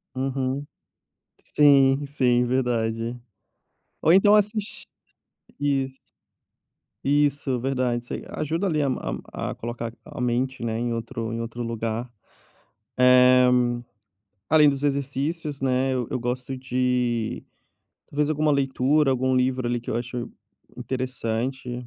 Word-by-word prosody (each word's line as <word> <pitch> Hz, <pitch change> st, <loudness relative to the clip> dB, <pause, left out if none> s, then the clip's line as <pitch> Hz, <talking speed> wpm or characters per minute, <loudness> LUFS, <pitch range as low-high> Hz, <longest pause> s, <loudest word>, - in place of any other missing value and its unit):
Uhum. 135 Hz, +1 st, -2 dB, 0.9 s
Sim, 140 Hz, -1 st, +5 dB
sim 125 Hz, -3 st, +2 dB
verdade. 120 Hz, -2 st, -1 dB, 0.8 s
Ou 160 Hz, -, +4 dB
então 205 Hz, +2 st, +6 dB
assiste 210 Hz, 0 st, 0 dB, 0.7 s
isso. 135 Hz, -2 st, -1 dB, 1.0 s
Isso, 140 Hz, -2 st, +1 dB
verdade, 125 Hz, -2 st, -1 dB
isso -, -, -7 dB
aí -, -, -5 dB
ajuda 165 Hz, +6 st, -2 dB
ali 155 Hz, -4 st, +1 dB
a 140 Hz, -, +1 dB, 0.5 s
a -, -, -3 dB
a -, -, -7 dB
colocar 115 Hz, 0 st, -5 dB
a -, -, -10 dB
mente, 125 Hz, +1 st, -1 dB
né, 115 Hz, -1 st, -2 dB
em 120 Hz, 0 st, -1 dB
outro 115 Hz, 0 st, -4 dB
em 115 Hz, -, -3 dB
outro 115 Hz, +1 st, -5 dB
lugar. 115 Hz, +1 st, -3 dB, 0.9 s
Eh, 125 Hz, 0 st, +6 dB, 1.0 s
além 155 Hz, -1 st, +6 dB
dos 140 Hz, 0 st, -4 dB
exercícios, 140 Hz, +2 st, -2 dB
né, 130 Hz, 0 st, +1 dB
eu 125 Hz, -2 st, -1 dB
eu -, -, -1 dB
gosto 125 Hz, +2 st, -3 dB
de 125 Hz, -3 st, -1 dB, 0.7 s
talvez 150 Hz, +1 st, 0 dB
alguma 155 Hz, 0 st, +1 dB
leitura, 140 Hz, +1 st, +2 dB
algum 130 Hz, 0 st, +1 dB
livro 130 Hz, 0 st, +1 dB
ali 120 Hz, 0 st, 0 dB
que 120 Hz, -, -7 dB
eu -, -, -1 dB
acho 120 Hz, 0 st, -4 dB, 0.5 s
interessante, 125 Hz, 0 st, -3 dB
130 Hz, 125 wpm, -24 LUFS, 120-140 Hz, 1.0 s, então